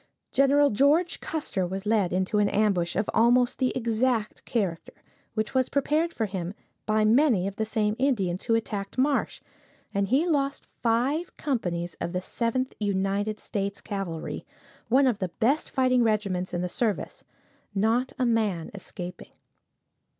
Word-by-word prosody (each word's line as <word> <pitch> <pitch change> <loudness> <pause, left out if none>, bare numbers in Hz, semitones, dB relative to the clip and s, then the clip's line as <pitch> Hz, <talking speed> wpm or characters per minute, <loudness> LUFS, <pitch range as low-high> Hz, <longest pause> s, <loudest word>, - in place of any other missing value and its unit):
Gen. 280 0 +4
George 295 - +3
Custer 260 - -2
was 190 +3 -5
led 210 -4 +2
into 190 +4 +1
an 205 -1 +3
ambush 195 -5 +1
of 205 - 0
almost 245 +2 +4
the 255 - +2
exact 230 -1 0
character, 190 -8 -2 0.4
which 215 0 -1
was 260 -1 +2
prepared 305 +4 +1
for 225 - -1
him 190 -1 -4 0.3
by 215 0 +3
many 230 -4 +4
of 200 - -6
the 220 - -1
same 215 -2 0
Indians 200 -9 0
who 230 - +3
attacked 210 -2 -3
Marsh, 275 +2 +1 0.5
and 200 0 +1
he 270 - +3
lost 280 -5 0 0.2
five 255 +9 0
companies 175 - -2
of 170 - -3
the 180 - -1
Seventh 250 +5 -1
United 200 +1 0
States 200 -1 -3
Cavalry, 190 -6 -5 0.5
one 265 +4 +5
of 240 -5 +1
the 185 - -2
best 250 - +1
fighting 255 -2 +3
regiments 200 -5 0
in 175 - -2
the - - 0
service, 215 +3 -2 0.5
not 225 +6 +2
a 255 - +1
man 215 -8 0
escaping. 180 -2 -8
220 Hz, 150 wpm, -27 LUFS, 195-255 Hz, 0.5 s, one